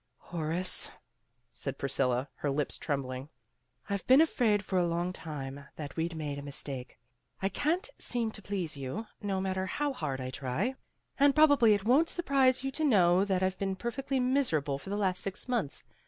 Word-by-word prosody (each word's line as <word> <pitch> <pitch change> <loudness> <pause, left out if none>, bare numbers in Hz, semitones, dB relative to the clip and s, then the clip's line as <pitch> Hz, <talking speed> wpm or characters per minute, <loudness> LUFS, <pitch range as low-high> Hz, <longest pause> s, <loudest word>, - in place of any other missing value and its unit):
"Horace," 170 +2 0 0.6
said - - -4
Priscilla, 130 -1 0
her 145 - -1
lips 140 +1 -1
trembling, 135 -1 -3 0.6
"I've 200 -2 -3
been 260 +2 +8
afraid 225 -10 +3
for 190 -2 +1
a 175 - +2
long 170 +2 -1
time 140 -4 -6
that 145 -3 -7
we'd 165 +1 -2
made 145 -3 -4
a - - -6
mistake. 140 -2 -3 0.4
I 195 - 0
can't 325 - 0
seem 235 -3 +1
to 210 - -7
please 185 -6 -3
you, 140 - -4 0.2
no 195 -2 -1
matter 190 0 -1
how 290 +8 -1
hard 140 - -3
I 130 0 -4
try, 130 - -1 0.5
and 280 0 +5
probably 285 -8 +6
it 200 0 -4
won 270 +8 +5
't - - -7
surprise 270 -6 +3
you 270 - -1
to 315 - -2
know 185 - +5
that 190 -2 +1
I've 185 0 0
been 195 -1 -1
perfectly 260 +6 -2
miserable 235 - +1
for 190 - -10
the 205 - -1
last 185 -3 +1
six 195 +4 -3
months. 235 - -1
190 Hz, 185 wpm, -31 LUFS, 145-245 Hz, 0.6 s, been